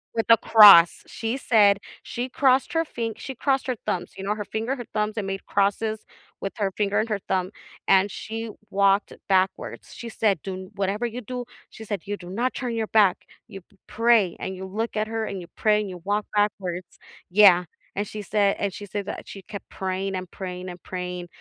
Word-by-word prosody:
with 225 - 0
a 230 - +8
cross. 205 -7 +8
She 225 +3 -3
said 210 -6 +4 0.3
she 245 +2 -4
crossed 265 +2 +2
her 325 - +2
fing 230 -5 -4
she 265 - -7
crossed 270 +1 0
her 255 - 0
thumbs, - - -2
you 190 - -6
know, 210 +1 0
her 210 - -4
finger, 225 +6 -2
her 245 -4 -7
thumbs, 215 0 0
and 205 -2 -2
made 195 0 -4
crosses 210 +2 0 0.4
with 195 - -4
her 200 -2 0
finger 205 0 +1
and 220 - 0
her 210 -2 -1
thumb, 185 0 0 0.4
and 195 +1 +4
she 225 0 -5 0.2
walked 200 0 +2 0.2
backwards. 190 0 0
She 235 - -8
said, 205 -7 +1
"Do 195 - -4
n 185 +1 -9
Whatever 200 +3 -1
you 240 +1 -4
do," 250 +2 -5 0.2
she 220 - -11
said, 200 -3 -3
"You 205 - -2
do 175 -2 -11
not 240 +7 -1
turn 245 -3 -3
your 220 -1 -1
back. 190 -3 +3 0.3
You 195 - -10
p 195 - -30
pray, 225 -5 +3
and 190 - -4
you 190 - -6
look 215 +4 -3
at 215 - 0
her, 225 -1 -1
and 195 -2 -5
you 170 - -10
pray, 210 -1 +3
and 205 - -5
you 180 -2 -9
walk 210 0 +1
backwards." 185 -4 -1 0.3
Yeah, 180 -2 +6 0.3
and 205 +1 -2
she 215 - -6
said 205 -1 +1
and 200 - -1
she 205 - -8
said 200 +2 -4
that - - -6
she 195 - -9
kept 200 +1 -9
praying 190 +1 -3
and 185 -1 -5
praying 185 -1 -6
and 175 -1 -10
praying, 180 -1 -5
205 Hz, 215 wpm, -24 LUFS, 190-225 Hz, 0.4 s, a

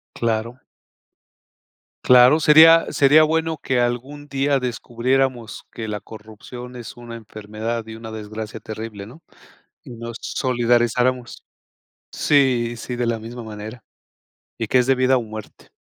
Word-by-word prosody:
Claro. 115 +2 -2 1.5
Claro, 125 +4 +7
sería 160 +2 +7
sería 145 +3 +5
bueno 160 +1 0
que 130 -3 -1
algún 130 +5 -3
día 140 -1 0
descubriéramos 125 0 -2
que 110 -1 -6
la 105 -1 -4
corrupción, 110 +4 -11
es 120 0 -10
una 120 -1 -9
enfermedad 110 +1 -6
y 110 0 -9
una 110 0 -9
desgracia 110 0 -7
terrible, 110 -2 -8
¿no?, 130 +10 -15 0.6
y - - -13
nos 115 -1 -8
solidarizáramos. 120 0 0 0.7
Sí, 125 -5 +2
sí, 125 +2 -6
de 120 0 -2
la 115 -1 -1
misma 115 +2 -9
manera. 110 +2 -9 0.8
Y 115 - -2
que 125 +4 +2
es 125 - +1
de 135 - +4
vida 130 +1 +3
o 125 - -1
muerte. 110 -1 -10
120 Hz, 135 wpm, -21 LUFS, 110-130 Hz, 1.5 s, Claro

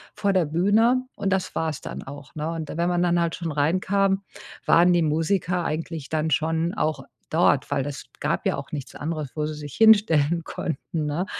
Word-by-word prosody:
vor 200 -1 +1
der 180 -4 +3
Bühne 215 +11 +3
und 195 -1 -2
das 185 -1 -2
wars 160 -3 -1
dann - - -7
auch, 140 +3 -11
ne? 155 +1 -3
Und 160 -2 -5
wenn 170 +2 +1
man 175 0 +1
dann 175 0 +2
halt 170 -1 0
schon 165 -3 -4
reinkam, 190 +6 +1 0.4
waren 175 +2 +5
die 175 - +3
Musiker 170 +3 0
eigentlich 160 -2 -4
dann 155 0 0
schon 160 +4 +1
auch 150 -4 -1 0.3
dort, 155 -4 +2
weil 135 - +1
das 145 0 -6 0.2
gab - - -1
ja - - +2
auch - - -8
nichts 140 -3 -6
anderes, 155 -3 -4
wo 150 -1 -1
sie 155 - -3
sich 145 -2 -8
hinstellen 170 -8 +5
konnten, 160 0 -4
ne? 160 +6 -1
165 Hz, 195 wpm, -24 LUFS, 150-180 Hz, 0.4 s, waren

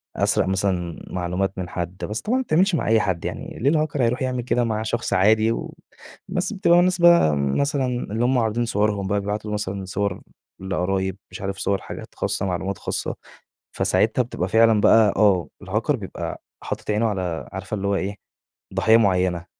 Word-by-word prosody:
أسرق - - +2
مثلًا 95 -3 -1
معلومات 90 +2 -2
من 90 -1 -4
حد، 90 +1 -5
بس 105 +1 -4
طبعًا 245 +4 0
ما 260 - 0
بتتعملش 185 -2 +2
مع - - -1
أي 110 0 +4
حد 95 -5 -1
يعني، - - -6
ليه 135 +5 +3
الHacker 145 -3 -3
هيروح 125 +3 +1
يعمل 130 -1 -1
كده 125 0 +1
مع 110 -2 -1
شخص 120 +2 -2
عادي 110 +4 +4
و - - -4 0.5
بس 185 +4 -2
بتبقى 175 -3 +4
الناس 180 0 +2
بقى 170 - +6
مثلًا 135 - 0
اللى 120 -2 -2
هُم 130 +1 +2
عارضين 115 +1 +1
صورهم 105 -2 0
بقى، 100 +1 +1
بيبعتوا 105 +1 -4
له - - -2
مثلًا 100 -2 -3
صور 100 0 -2 0.4
لقرايب، 95 0 -1
مش - - -8
عارف 95 0 -3
صور 100 0 0
حاجات - - -9
خاصة، 95 - -1
معلومات 95 +1 -2
خاصة. - - -3 0.6
فساعتها 110 +3 +2
بتبقى 95 -6 -4
فعلًا 110 0 +4
بقى، 110 -2 +5
آه 95 -5 +3 0.2
الHacker 105 +8 -1
بيبقى 100 -6 -6 0.2
حاطط - - -4
عينه 110 +2 +1
على 90 -6 -3
عارفة 95 +2 -4
اللي 100 -1 -3
هو 100 - +1
إيه، 100 +1 -2 0.6
ضحية 110 0 +5
معينة، 90 -5 +1
105 Hz, 185 wpm, -23 LUFS, 95-120 Hz, 0.6 s, بقى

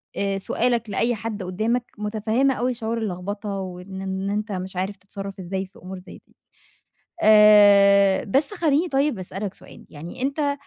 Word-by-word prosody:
آآ 195 -1 -1
سؤالك 235 +2 -1
لأي 235 +3 0
حد 215 -2 -5
قُدّامك، 220 +7 -1
متفهّمة 220 +5 0
أوي 250 +1 -1
شعور 230 0 -3
اللخبطة 205 0 -4
وإن 190 +1 -7
إن 190 +1 -3
أنت 210 +1 -2
مش 185 0 -5
عارف 190 +3 -2
تتصرّف 195 0 -9
إزاي 190 +1 -4
في 190 - -19
أمور 185 +1 -8
زي 185 - -13
دي. - - -30 0.9
آآ 200 -2 +6
بس 275 - +1
خلّيني 325 -1 +1
طيب 275 -5 0
أسألك 190 +1 -5
سؤال، - - -15
يعني 165 - -9
أنت 275 +3 -2
آآ، 285 -1 +1
205 Hz, 165 wpm, -23 LUFS, 190-235 Hz, 0.9 s, آآ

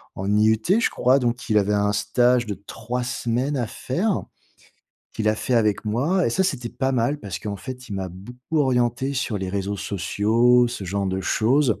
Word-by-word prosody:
en 100 +2 -1
IUT, 110 +1 +3 0.2
je - - +2
crois. 130 +3 +3
Donc 120 -1 -2
il 105 - +4
avait 105 +1 +1
un 105 0 +1
stage 120 +4 +2
de 105 - -3
3 125 +3 -4
semaines 125 +3 -1
à 120 -3 -1
faire, 185 - -1 0.9
qu'il 110 - -2
a 110 - +3
fait 125 - -1
avec 110 -3 +2
moi 150 - +1
et - - +1
ça 190 - +1
c'était 125 -9 -2
pas 135 0 -1
mal, 130 +4 +1
parce 95 -4 -5
qu'en 100 -1 -4
fait 125 +2 -8
il 100 - -5
m'a 95 -1 -3
beaucoup 125 - -5
orienté 130 0 +1
sur 115 -5 -1
les 95 -1 -4
réseaux 100 +1 -2
sociaux, 115 +6 +2
ce 120 -5 -6
genre 100 +2 -2
de 95 0 -1
choses. 120 +4 +2
120 Hz, 200 wpm, -23 LUFS, 105-125 Hz, 0.9 s, il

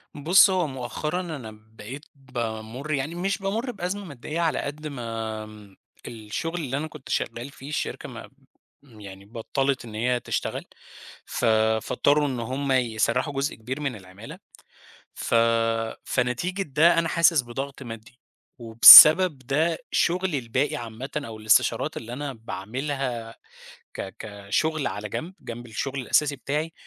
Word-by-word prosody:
بُصّ، 175 +8 +5
هو 180 -4 0
مؤخرًا 140 +6 -4
أنا 145 -11 -7
بقيت 110 +6 -11
بامُر 120 +1 -6
يعني 145 +5 -2
مش 195 +3 -1
بامُر 220 +6 -3
بأزمة 195 0 -5
مادّية 150 +2 -6
على 165 -2 0
قد 150 +2 -5
ما 110 -5 -7 0.3
الشغل 120 +10 -5
اللي 135 -1 -3
أنا 155 +2 -3
كنت 150 -4 -13
شغّال 120 +4 -3
فيه، 140 +1 -11
الشركة 150 - -4
ما - - -10 0.5
يعني 100 -6 -13
بطّلِت 130 +4 -2
إن 110 -2 -10
هي 125 +2 0
تشتغل - - -4 0.6
ف - - -3 0.4
فاضطروا 145 0 +1
إن 130 -3 -3
هُم 135 +4 -3
يسَرّحوا 125 +2 0
جزء 140 +2 -2
كبير 125 +6 -6
من 135 -5 -2
العمَالة، 95 +3 -12 0.7
ف - - -2 0.7
فنتيجة 150 +11 -1
ده 165 +3 +3
أنا 165 - 0
حاسس 170 -3 +4
بضغْط 135 +3 -7
مادّي 115 +1 -11 0.4
وبسبب 150 +8 +10
ده 150 +6 0
شُغلي 180 -4 +1
الباقي 130 +4 -1
عامةً 120 +3 -7
أو 115 -7 -6
الإستشارات 110 0 +2
اللي 120 +1 -7
أنا 140 0 -5
باعملها 115 +3 -5 0.6
ك 95 -1 -7
كشُغل 110 +9 -2
على 105 0 -5
جنب، 170 - -5
جنب 120 +1 -8
الشغل 135 +4 -4
الأساسي 145 +3 +1
بتاعي 150 +4 -3
135 Hz, 135 wpm, -25 LUFS, 115-155 Hz, 0.7 s, وبسبب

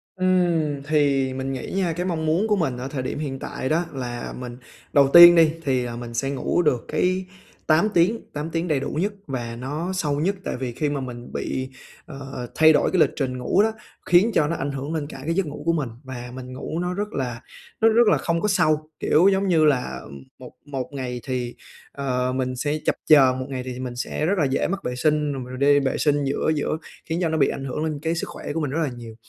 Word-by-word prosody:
Ừm, 175 -6 +1
thì 140 -3 +1
mình 135 +1 -3
nghĩ 130 - -5
nha, 180 -4 +1
cái 175 +2 -3
mong 160 -3 -2
muốn 170 +8 +2
của 210 - +3
mình 135 -9 -1
ở 130 +2 -5
thời 135 -2 -4
điểm 130 - -4
hiện 135 -3 -4
tại 130 - -4
đó 170 +3 +1
là 120 -2 -5
mình 125 -1 -7 0.4
đầu 140 -1 +5
tiên 175 0 +11
đi 160 -2 +6
thì 130 -3 +1
là 120 -1 -5
mình 120 -1 -7
sẽ 135 +4 -1
ngủ 140 +5 0
được 145 -7 +1
cái 185 +1 0 0.4
8 165 +6 +4
tiếng, 185 +7 +3
8 150 +2 -4
tiếng 165 +2 -2
đầy 150 -4 +1
đủ 140 - -3
nhất 200 +6 -1
và 120 -3 -4
nó 150 +9 -4
sâu 150 -5 -1
nhất. 195 +5 +1
Tại - - -3
vì 125 -2 -3
khi 145 +5 -1
mà 140 -2 -2
mình 120 -1 -8
bị, 130 0 -3 0.4
ờ, 135 -5 -7
thay 160 0 +6
đổi - - +2
cái 185 - +2
lịch - - +5
trình 130 -3 -2
ngủ 150 +10 +2
đó, 220 - +2 0.3
khiến 185 +6 +4
cho 150 - +3
nó 170 - -1
ảnh 140 0 -3
hưởng 140 +4 -4
lên 150 -3 -2
cả 135 - -9
cái 165 - 0
giấc 195 -1 +1
ngủ 150 0 -7
của 165 - +3
mình 145 -7 -1
và 125 -2 -7
mình 130 0 -8
ngủ 150 +5 -4
nó 180 0 -2
rất 205 +2 -3
là 125 -3 -3 0.4
nó 225 - +6
rất 230 0 +4
là - - +5
không 170 0 -1
có 210 - +1
sâu, 155 -5 +2
kiểu, 175 +6 +4
giống 195 0 +2
như 160 -4 +4
là 125 - +1 0.4
một - - -10
một 135 -3 -4
ngày 125 -2 -4
thì, 125 -2 -3 0.4
ờ, 130 -2 -1
mình 130 -1 -1
sẽ 145 +4 -1
chập - - +2
chờn, 130 -4 +6
một 130 - -3
ngày 130 -2 -4
thì 125 -1 -6
mình 125 -1 -5
sẽ 140 +4 -2
rất 195 +3 +1
là 150 - +2
dễ 135 0 0
mắc 195 +1 -3
vệ 125 - -3
sinh, 150 +1 +1
rồi 130 -1 -6
đi 145 +1 +4
vệ 135 -1 -1
sinh 145 -1 +2
giữa 140 +3 0
giữa 150 +1 -1 0.3
khiến 165 +2 -2
cho 165 - +1
nó 160 - 0
bị 140 - +4
ảnh 135 - -4
hưởng 150 +4 -3
lên 155 -2 -2
cái 165 +1 -1
sức - - -3
khỏe - - -6
của 165 - -1
mình 140 -3 -2
rất 160 - -1
là 145 - -1
nhiều. 115 -2 -10
145 Hz, 250 wpm, -23 LUFS, 130-165 Hz, 0.4 s, tiên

